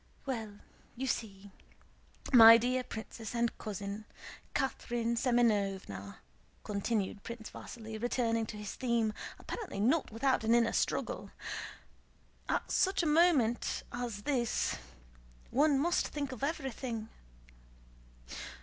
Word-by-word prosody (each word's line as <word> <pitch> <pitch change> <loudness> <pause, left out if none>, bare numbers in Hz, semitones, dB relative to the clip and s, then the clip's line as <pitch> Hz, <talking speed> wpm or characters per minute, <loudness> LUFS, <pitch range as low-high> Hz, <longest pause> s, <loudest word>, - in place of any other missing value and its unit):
"Well, 220 -6 -4 0.4
you 260 +2 -3
see, 200 -5 -3 0.8
my 230 -1 +11
dear 250 +2 0
princess 225 -1 -7
and 235 0 +1
cousin, 205 0 -5 0.5
Catherine 240 -4 -1
Semënovna," 200 - +1 0.5
continued 200 -1 -1
Prince 235 0 -8
Vasíli, 220 -2 -8
returning 230 -2 +1
to 210 - -7
his 210 -1 -5
theme, 235 -4 +1 0.2
apparently 415 - -6
not 265 +9 +2
without 255 +2 +1
an 225 +1 +4
inner 230 -1 +3
struggle; - - -1 1.2
"at - - -1
such 380 -1 +2
a - - 0
moment 300 -7 +3
as 235 -4 -4
this 245 -4 0 0.8
one 290 +2 +4
must 340 +6 +2
think 285 -3 -4
of 255 +1 -7
everything. 260 -6 -3
235 Hz, 110 wpm, -33 LUFS, 215-260 Hz, 1.2 s, my